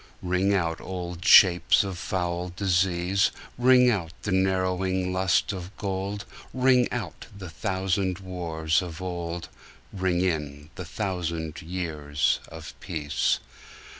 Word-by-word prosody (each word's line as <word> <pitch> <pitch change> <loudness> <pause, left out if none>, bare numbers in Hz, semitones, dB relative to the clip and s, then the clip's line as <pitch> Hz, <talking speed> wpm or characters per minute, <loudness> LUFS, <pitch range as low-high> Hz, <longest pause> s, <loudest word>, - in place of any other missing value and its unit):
Ring 90 +2 +1
out 85 -4 0
old 90 -2 -6
shapes 90 0 +6
of 95 -2 -4
foul 90 0 -2
disease, 95 0 +2 0.3
Ring 125 0 +5
out 85 -7 -2
the 105 - -2
narrowing 95 0 0
lust 95 +2 +1
of 95 +1 -8
gold; 100 +1 -3 0.3
Ring 125 -1 +3
out - - -5
the 95 -4 -8
thousand 95 -1 -1
wars 85 -4 -1
of 85 -3 -7
old, 85 -2 -4 0.5
Ring 95 -2 0
in 75 -4 -2
the 90 -1 -7
thousand 85 -4 -3
years 80 -4 -1
of - - -9
peace. 75 -3 -1
90 Hz, 120 wpm, -26 LUFS, 85-95 Hz, 0.5 s, shapes